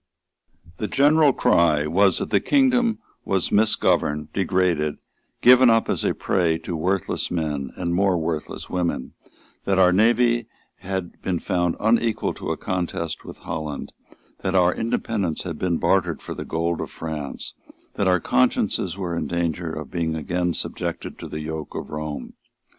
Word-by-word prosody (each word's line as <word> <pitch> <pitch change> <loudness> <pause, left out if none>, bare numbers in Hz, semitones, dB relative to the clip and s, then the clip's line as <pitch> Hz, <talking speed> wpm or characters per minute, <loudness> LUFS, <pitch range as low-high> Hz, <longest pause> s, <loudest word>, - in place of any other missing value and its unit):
The 105 - -2
general 145 +3 +4
cry 80 - +3
was 95 +3 +3
that - - -2
the - - +4
kingdom 250 -5 +3 0.3
was 95 -2 0
misgoverned, 75 -8 +2
degraded, 90 -6 +1 0.5
given 125 0 +8
up 115 0 +3
as - - -1
a - - +1
prey 85 -4 +1
to 85 - -5
worthless 95 +3 -1
men 75 -6 -2
and 85 -1 -2
more 95 0 +2
worthless 80 -2 -4
women, 90 -7 -2 0.5
that 95 -1 +1
our 90 -1 +5
navy 120 +3 +3 0.3
had 95 -1 -5
been 90 -2 -1
found 90 0 0
unequal 115 +1 +1
to - - -6
a - - -1
contest 85 -3 -3
with - - -10
Holland, 80 -3 -5 0.5
that 95 - -2
our 90 -1 +4
independence 105 -6 -2
had 85 -4 -5
been 90 -2 0
bartered - - +1
for - - -7
the - - -6
gold 85 +1 -1
of - - -5
France, 80 -3 -6 0.4
that 100 - 0
our 90 -1 +4
consciences 65 +6 +1
were 90 -3 -3
in - - -2
danger 85 -1 -2
of 80 -3 -7
being 85 -3 -1
again 90 +2 -1
subjected - - -4
to - - -7
the 75 - -5
yoke 80 0 -6
of - - -6
Rome. 75 -1 -5
90 Hz, 160 wpm, -23 LUFS, 80-100 Hz, 0.5 s, given